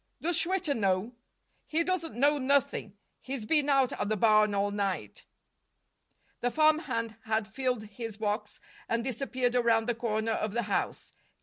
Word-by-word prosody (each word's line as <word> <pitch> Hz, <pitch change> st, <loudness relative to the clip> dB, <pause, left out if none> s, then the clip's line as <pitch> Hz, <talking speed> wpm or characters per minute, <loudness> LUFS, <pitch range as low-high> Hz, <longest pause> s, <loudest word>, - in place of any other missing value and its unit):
"Does 345 Hz, +1 st, 0 dB
Schwitter 340 Hz, -2 st, +2 dB
know?" 195 Hz, 0 st, 0 dB, 0.5 s
"He 320 Hz, +2 st, +1 dB
doesn't 335 Hz, -6 st, -2 dB
know 285 Hz, +4 st, +3 dB
nothing. 260 Hz, -6 st, 0 dB, 0.2 s
He's 260 Hz, -4 st, -5 dB
been 295 Hz, +3 st, +2 dB
out 270 Hz, -2 st, +3 dB
at 205 Hz, -, -3 dB
the 215 Hz, -, 0 dB
barn 215 Hz, -1 st, +4 dB
all 200 Hz, +1 st, +1 dB
night." 190 Hz, -, -3 dB, 1.1 s
The 245 Hz, -, 0 dB
farmhand 260 Hz, -, +1 dB
had 220 Hz, -1 st, 0 dB
filled 250 Hz, 0 st, -2 dB
his 215 Hz, 0 st, -7 dB
box 210 Hz, 0 st, -3 dB, 0.3 s
and 230 Hz, 0 st, 0 dB
disappeared 255 Hz, 0 st, -1 dB
around 230 Hz, -2 st, +3 dB
the 240 Hz, -, +2 dB
corner 225 Hz, -1 st, -1 dB
of 215 Hz, -1 st, -1 dB
the 235 Hz, +1 st, 0 dB
house. 205 Hz, -1 st, -2 dB
230 Hz, 150 wpm, -29 LUFS, 215-275 Hz, 1.1 s, barn